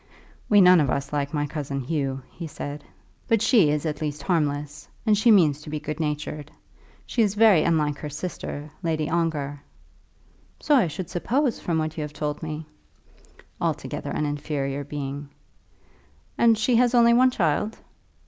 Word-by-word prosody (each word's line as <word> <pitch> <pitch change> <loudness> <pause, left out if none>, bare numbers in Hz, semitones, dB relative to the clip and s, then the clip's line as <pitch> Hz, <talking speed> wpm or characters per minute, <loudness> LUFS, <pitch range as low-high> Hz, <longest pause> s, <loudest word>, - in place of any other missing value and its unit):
"We 205 -1 +6
none 180 -1 +7
of 140 - +1
us 140 +3 -2
like 145 -1 -1
my 145 -2 -1
cousin 140 -2 -4
Hugh," 135 -1 -2
he 170 - -7
had - - -7
said. 145 +1 -6 0.4
"But 225 -2 +3
she 220 - +5
is 150 +1 -1
at 150 0 -3
least 150 -1 -3
harmless, 150 -4 -1 0.2
and 215 -2 +4
she 215 +3 +3
means 155 -9 +5
to 150 - -10
be 155 0 -3
good 150 +1 -5
natured. 150 -1 -3 0.6
She 240 - 0
is 205 -2 +2
very 210 -6 +6
unlike 150 -4 +1
her 150 - -5
sister, 150 -1 -6
Lady 160 -3 -1
Ongar." 150 -4 -1 1.0
"So 300 - +1
I 245 -10 +5
should 165 +2 -6
suppose, 245 - 0
from 170 -2 -1
what 155 0 -2
you - - -2
have 150 0 -5
told 150 -1 -3
me." 155 0 -5 1.0
"Altogether - - -3
an 150 - -1
inferior 145 -1 -3
being." 140 0 -6 1.1
"And 230 -1 +4
she 230 +2 +2
has 245 0 +3
only 235 -1 +6
one 255 +2 +5
child." 210 0 0
155 Hz, 170 wpm, -25 LUFS, 145-185 Hz, 1.1 s, none